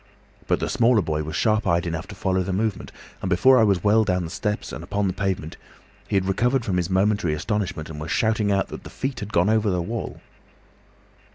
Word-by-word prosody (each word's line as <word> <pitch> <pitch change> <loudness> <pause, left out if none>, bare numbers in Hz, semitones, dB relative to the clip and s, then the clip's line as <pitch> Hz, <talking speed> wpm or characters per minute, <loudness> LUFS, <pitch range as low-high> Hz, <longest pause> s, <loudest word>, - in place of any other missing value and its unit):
But - - +2
the - - -2
smaller 115 -3 +3
boy 75 -1 -1
was 80 0 -5
sharp 110 0 +1
eyed 85 -1 +2
enough 80 -1 -4
to 105 - -9
follow 95 0 0
the 95 +1 -3
movement, 100 +1 -2 0.3
and 95 - -2
before 130 +8 +5
I - - +5
was 100 -5 +2
well 110 +2 +4
down 90 -3 0
the 80 - -6
steps 105 +2 -3
and 80 - -6
upon 100 +3 -1
the 95 - 0
pavement, 95 -5 -3 0.5
he - - -2
had 95 -1 +2
recovered 120 +6 +1
from 95 -3 0
his 90 -2 -1
momentary 95 -4 +1
astonishment 90 -2 -2
and 75 -2 -8
was 75 - -5
shouting 110 0 +1
out 100 0 +1
that - - -8
the - - -9
feet 130 -1 -4
had 105 -2 -6
gone 90 +5 +3
over 110 -1 +2
the 90 -2 0
wall. 110 +6 -4
95 Hz, 225 wpm, -23 LUFS, 90-110 Hz, 0.5 s, before